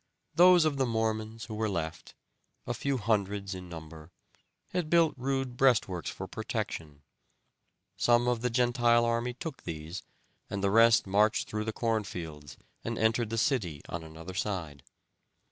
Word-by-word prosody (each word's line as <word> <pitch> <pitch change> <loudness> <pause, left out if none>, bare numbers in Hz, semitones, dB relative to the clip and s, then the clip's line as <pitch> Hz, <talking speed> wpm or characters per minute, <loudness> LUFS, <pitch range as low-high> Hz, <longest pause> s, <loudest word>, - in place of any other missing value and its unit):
Those 180 -1 +7
of 150 -3 +1
the 130 -1 +1
Mormons 110 -1 -2
who 110 - -7
were 110 0 -1
left, 85 -3 -4 0.5
a - - -2
few 140 -1 -1
hundreds 100 -3 0
in 90 -1 -8
number, 80 -1 -10 0.6
had 175 -4 -2
built 165 -2 +4
rude 135 -1 -2
breastworks 115 -10 +2
for - - -6
protection; 75 -3 -5 0.9
some 120 0 +3
of 120 -2 +1
the 125 - +1
Gentile 120 -1 +3
army 115 +1 0
took 150 +1 -6
these, 80 +3 -6 0.5
and 100 -1 -3
the 100 - +2
rest 115 +1 +6
marched 105 +3 +2
through 105 0 -3
the 110 - -1
corn 115 -1 0
fields, 80 -6 -8 0.3
and 115 0 -3
entered 110 0 +2
the 115 - -2
city 100 - 0
on 85 -1 -4
another 80 +3 -9
side. 85 -8 -3
110 Hz, 155 wpm, -30 LUFS, 90-120 Hz, 0.9 s, Those